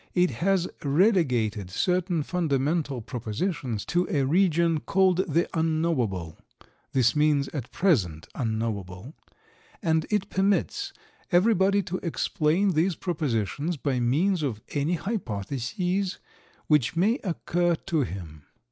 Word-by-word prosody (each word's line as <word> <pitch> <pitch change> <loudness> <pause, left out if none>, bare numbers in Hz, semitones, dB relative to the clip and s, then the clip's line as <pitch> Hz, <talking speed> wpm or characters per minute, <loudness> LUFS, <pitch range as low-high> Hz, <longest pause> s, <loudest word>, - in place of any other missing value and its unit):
It 180 0 +3
has 190 -1 +2 0.2
relegated 135 - +2
certain 180 - 0
fundamental 145 -4 0
propositions 120 - -3
to 175 +1 0
a 145 -8 +1
region 170 0 +3
called 190 +2 +2
"the 170 +4 +2
Unknowable" 155 - -1 0.5
(this 125 -1 +3
means 150 -2 +2
at 135 -6 -6
present 95 - +1
unknowable), 110 - -3 0.7
and 160 -5 +1
it 210 -2 -1
permits 200 - 0 0.4
everybody 195 +1 +4
to 185 0 -3
explain 170 +2 +1
these 170 +2 +1
propositions 150 - -2
by 135 -2 -1
means 160 +10 +2
of 130 -8 -2
any 145 +4 0
hypotheses 180 - -2 0.5
which 150 -2 +2
may 215 - +2
occur 175 -2 0
to 165 -2 -1
him. 85 - -6
160 Hz, 110 wpm, -26 LUFS, 125-180 Hz, 0.7 s, everybody